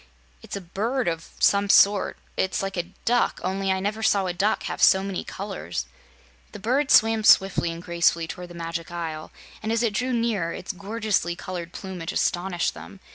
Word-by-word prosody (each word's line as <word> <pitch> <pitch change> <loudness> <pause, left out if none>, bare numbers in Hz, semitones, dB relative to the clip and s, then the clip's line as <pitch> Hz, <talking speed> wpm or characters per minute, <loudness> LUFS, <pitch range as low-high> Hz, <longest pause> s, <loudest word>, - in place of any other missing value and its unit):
"It's - - -7
a 200 - -5
bird 225 +9 -2
of 165 -1 -3
some 200 0 +3
sort. 200 0 +5 0.2
It's 190 +1 0
like 195 0 -3
a 175 0 -3
duck, 245 +1 +2
only 195 0 -1
I 190 - +1
never 210 +3 -2
saw 200 -3 +3
a 180 - -1
duck 205 +5 0
have - - -4
so 190 0 +6
many 195 -2 -3
colors." 195 - -5 0.7
The - - -8
bird 260 +7 +1
swam 225 0 +5
swiftly 195 -4 +5
and 165 +1 -8
gracefully 170 -1 +1
toward 180 +2 -7
the 175 - -12
Magic 165 0 -5
Isle, 165 -2 -5 0.3
and 220 0 -2
as 230 +1 +1
it 225 -3 +1
drew 250 +5 -1
nearer 230 -8 0
its 185 - -5
gorgeously 200 -2 -1
colored 175 -2 -6
plumage 180 -4 -6
astonished 175 -1 0
them. 195 - -11
190 Hz, 185 wpm, -25 LUFS, 175-215 Hz, 0.7 s, so